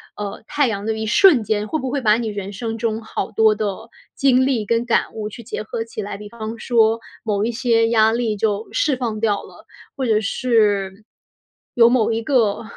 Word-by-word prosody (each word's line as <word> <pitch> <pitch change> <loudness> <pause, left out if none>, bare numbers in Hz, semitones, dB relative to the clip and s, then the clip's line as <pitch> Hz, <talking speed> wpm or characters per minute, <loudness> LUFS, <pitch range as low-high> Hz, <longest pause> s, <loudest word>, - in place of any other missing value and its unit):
呃， 205 0 -6
太 290 -2 +1
阳 205 -2 -3
的 220 - 0
一 220 - -3
瞬 270 - +5
间， 210 0 -1
会 315 - -2
不 260 - -3
会 280 +1 -2
把 215 -2 +4
你 235 -1 -3
人 200 -1 -5
生 225 +2 -4
中 225 -1 -2
好 220 - -5
多 220 0 +3
的 215 +1 -4 0.3
经 260 -1 +3
历 245 -6 0
跟 230 +3 0
感 235 - 0
悟 215 -1 -5
去 235 - -10
结 220 - -5
合 225 +1 -4
起 225 -1 -7
来？ 205 -1 -6
比 210 0 -10
方 225 0 -7
说 225 -2 +2 0.2
某 210 -2 -1
一 235 - -1
些 230 -2 +2
压 220 -1 +4
力 230 -2 -1
就 210 +1 -1
释 310 - +1
放 230 -4 -3
掉 210 -2 0
了， - - -15 0.3
或 270 - -2
者 220 -2 +2
是 210 -4 0 0.7
有 235 -1 +6
某 235 -2 +2
一 225 0 -1
个， 230 -5 +1
225 Hz, 225 characters per minute, -20 LUFS, 210-240 Hz, 0.7 s, 有